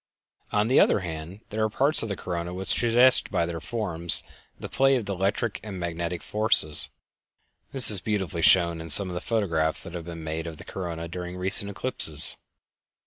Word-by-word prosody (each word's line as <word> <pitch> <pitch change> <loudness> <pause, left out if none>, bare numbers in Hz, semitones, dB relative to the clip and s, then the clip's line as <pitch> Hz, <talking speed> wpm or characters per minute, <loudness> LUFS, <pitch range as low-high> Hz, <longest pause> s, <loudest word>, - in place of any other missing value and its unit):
On 105 +1 0
the 130 - +3
other - - +2
hand, 85 +3 -9
there 110 0 -3
are 110 - -1
parts 140 +8 +1
of 115 - -5
the 100 - -4
corona 85 0 -6
which 95 +1 -5
suggest 120 +2 +2
by 85 - -1
their 85 -1 -6
forms 85 -4 +2 0.4
the - - -8
play 135 0 +1
of 115 -6 -4
electric 100 +3 -3
or 105 - -9
magnetic 85 -1 -6
forces. 105 -8 +5 0.8
This 130 -4 +7
is 100 -4 +4
beautifully 95 -5 -4
shown 85 -1 +3
in 80 - -10
some 95 +5 +4
of - - -7
the 90 - -6
photographs 85 -8 -2
that 85 - -12
have 85 -2 -8
been 85 -1 -9
made 80 +1 -6
of 80 -2 -9
the - - -14
corona 85 -3 -7
during 90 +1 -8
recent 95 +2 -1
eclipses. 90 - +2
90 Hz, 190 wpm, -24 LUFS, 85-105 Hz, 0.8 s, This